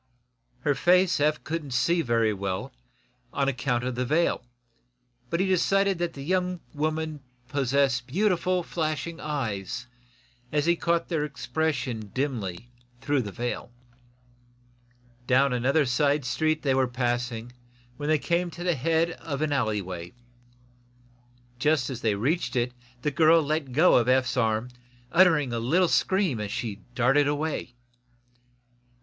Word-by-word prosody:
Her 145 +2 +2
face 180 +3 +3
Eph 150 +1 +1
couldn't 155 -5 -4
see 170 +6 +2
very 115 -5 +2
well, 100 +6 -4 0.6
on 140 - 0
account 125 -2 0
of 125 0 -2
the 125 +1 -1
veil, 155 +2 +1 0.9
but 170 - -1
he 190 - +2
decided 195 0 +2
that 175 -1 -1
the 135 - -8
young 180 +2 0
woman 155 0 -2 0.3
possessed 135 -2 +1
beautiful, 180 +2 +1
flashing 160 0 -3
eyes, 120 -6 -3 0.7
as 150 0 +1
he 170 +1 +4
caught 170 0 0
their 160 -4 0
expression 130 -5 -2
dimly 120 -6 -3 0.3
through 145 +1 +1
the 105 -4 -5
veil. 120 +2 -4 1.6
Down 130 +1 +4
another 130 +6 +2
quiet 140 - +1
side 140 +2 +2
street 155 +4 0
they 135 -2 +2
were 130 -1 +2
passing, 120 -1 -2 0.5
when 145 0 -3
they 155 - +4
came 170 +3 0
to 170 +1 -8
the 175 -1 +2
head 165 +4 +1
of 155 -3 -4
an 150 -1 0
alley 110 -7 0
way. 90 +1 -7 1.4
Just 145 -2 +2
as 120 -2 -6
they 110 -3 +1
reached 135 - -1
it 125 0 0 0.3
the 150 - +1
girl 165 +2 +5
let 150 -2 -2
go 160 +8 +5
of 120 -1 +2
Eph's 130 0 +2
arm, 115 -1 +1 0.4
uttering 165 -8 +4
a 115 - -1
little 165 +11 +3
scream 185 - +1
as 105 -1 -4
she 110 -4 -3 0.2
darted 135 +4 +3
away. 145 -4 -2
140 Hz, 145 wpm, -26 LUFS, 120-160 Hz, 1.6 s, girl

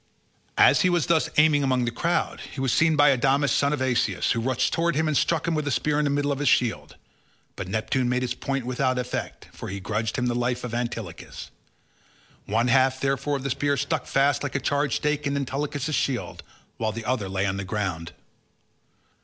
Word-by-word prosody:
As - - +6
he 185 - +3
was 175 -3 +1
thus 165 -2 +2
aiming 150 -1 +5
among 130 -3 +1
the 120 - -1
crowd, 170 +7 -1
he - - -9
was 130 -2 +1
seen 160 0 +3
by 145 -1 +6
Adamas, 135 +2 +2
son 140 +3 +2
of 145 -3 -1
Asius, 120 -8 +1
who 115 - +1
rushed 130 +2 0
towards 165 -2 +1
him 160 0 +1
and 155 - 0
struck 165 +3 +1
him 170 - +1
with 155 -2 -1
a - - +1
spear 150 +2 0
in 150 - +1
the - - +1
middle 145 0 0
of 140 - -2
his 145 -3 +2
shield, 120 -3 0 0.6
but - - -6
Neptune 110 +5 -1
made 125 +1 0
its 125 -1 -1
point 135 0 -3
without 130 +1 0
effect, 125 0 -5
for - - -7
he 100 +1 -5
grudged 110 +3 -2
him 125 - 0
the 120 - 0
life 120 0 -1
of 120 -2 -5
Antilochus. 115 -8 -5 1.0
One 115 +4 +1
half, 130 +1 +3
therefore, 140 +1 0
of 135 - -8
the 140 - -2
spear 145 +1 0
stuck 155 -3 -2
fast 135 -1 +2
like 145 -1 -4
a - - +2
charred 145 +1 0
stake 150 +1 0
in 140 - -1
Antilochus's 140 +2 -2
shield, 135 -3 -2 0.4
while 110 -1 -1
the 115 +1 -7
other 120 -6 -1
lay 95 +1 -1
on 95 0 -1
the 100 - -3
ground. 90 -4 -3
130 Hz, 215 wpm, -25 LUFS, 120-145 Hz, 1.0 s, As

